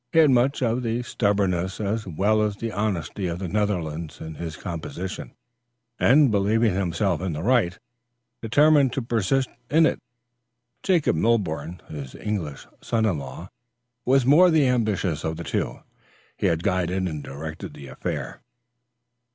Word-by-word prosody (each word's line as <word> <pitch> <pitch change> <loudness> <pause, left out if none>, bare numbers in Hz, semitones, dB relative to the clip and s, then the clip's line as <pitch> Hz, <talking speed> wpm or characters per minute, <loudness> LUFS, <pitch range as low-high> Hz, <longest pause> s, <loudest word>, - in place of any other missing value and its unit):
He - - -1
had 155 -4 +7
much 130 +3 +2
of 120 +1 +1
the 120 0 -1
stubbornness 95 -5 0
as 105 0 -2
well 100 +6 +2
as 105 -1 0 0.2
honesty 100 -2 -2
of 85 0 -3
the 95 0 -4
Netherlands 85 -6 -2
in 80 0 -7
his 80 0 -6
composition, 90 +2 -6 0.7
and 135 0 +5
believing 105 +1 +2
himself 90 -1 0
in 95 -3 -2
the 75 +2 -4
right, 115 -8 +2 0.6
determined 140 +2 +4
to 135 - -2
persist 120 +3 +1 0.2
in 160 +2 +5
it. - - +1 0.8
Jacob 175 - +2
Milborne, 85 -5 -1
his 70 -4 -8
English 95 -10 -4 0.2
son 115 -1 0
in 95 -8 +1
law, 85 +6 -8 0.5
was 135 +1 +4
the 125 - +1
more 170 +6 +7
ambitious 115 - +1
of 80 0 -2
the 85 - -5
two, - - -2 0.6
and - - +2
had 85 0 -1
guided 95 0 0
and 75 -4 -5
directed 80 +3 -7
the 70 - -10
affair. 65 -1 -5
100 Hz, 150 wpm, -24 LUFS, 85-120 Hz, 0.8 s, had